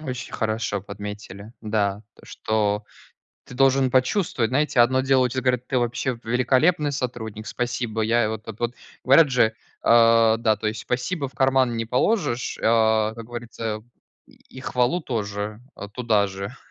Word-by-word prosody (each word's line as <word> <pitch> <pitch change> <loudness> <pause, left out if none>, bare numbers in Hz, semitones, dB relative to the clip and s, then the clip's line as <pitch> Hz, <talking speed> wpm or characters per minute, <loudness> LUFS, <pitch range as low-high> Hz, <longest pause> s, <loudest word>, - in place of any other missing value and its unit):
Очень 130 -5 -6
хорошо 110 -2 -2
подметили, 105 +1 -8
да, 105 -2 -1
то, - - -19
что 105 -1 -1 0.6
ты - - -13
должен 135 0 +3
почувствовать. 130 - +1
Знаете, 140 0 +1
одно 130 +2 +4
дело 130 -1 +3
тебе 125 - -7
щас 130 - -1
говорят: 125 -1 0
"Ты 130 - 0
вообще 120 +1 -1
великолепный 130 +6 +2
сотрудник. 110 -5 -5
Спасибо." 120 -2 -2
Я 115 0 +2
вот 110 0 -6
вот 110 -1 -8
вот 120 +1 -1 0.3
говорят 140 +4 +6
же, 120 -4 +3 0.3
а, 115 -1 +5
да, 110 -2 +2
то 105 +1 -3
есть: 110 +1 -3
"Спасибо 140 +4 -2
в 130 - -16
карман 130 -2 +2
не 115 0 -2
положишь". 125 - 0
А 110 -1 +3
как 115 0 -9
говорится: 115 -2 -5 0.4
"И - - -22 0.2
и - - -7
хвалу 125 +7 0
тоже, 105 -4 -4 0.2
а, 100 - -8
туда 105 -2 +1
же". 95 +1 -7
115 Hz, 160 wpm, -23 LUFS, 110-130 Hz, 0.6 s, говорят